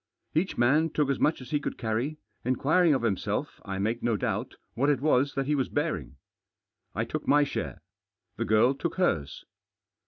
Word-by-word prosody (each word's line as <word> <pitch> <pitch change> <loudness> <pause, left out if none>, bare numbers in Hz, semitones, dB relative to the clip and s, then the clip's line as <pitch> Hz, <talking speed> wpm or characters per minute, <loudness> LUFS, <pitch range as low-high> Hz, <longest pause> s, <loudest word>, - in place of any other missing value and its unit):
Each 175 +4 0
man 150 +7 +4
took 150 -2 +1
as 135 - -1
much 150 -2 +2
as 130 - -10
he 150 - +2
could - - -4
carry— 120 +7 -2 0.3
inquiring 150 +6 +3
of 130 - -2
himself, 100 -6 -2
I 95 0 -4
mak£ 110 +5 -1
no 115 -3 +1
dbubtj - - -2 0.2
what 135 +6 +1
it 145 - +2
was 140 -1 +2
that 135 0 0
he 150 - +1
Was 135 -3 0
bearing, 150 - -2 0.8
t - - +1
took - - -5
ktty 145 0 +5
share. - - -4 0.5
The - - -2
girl 110 +5 +4
took 165 +5 -3
hers. 80 - 0
135 Hz, 185 wpm, -28 LUFS, 115-150 Hz, 0.8 s, ktty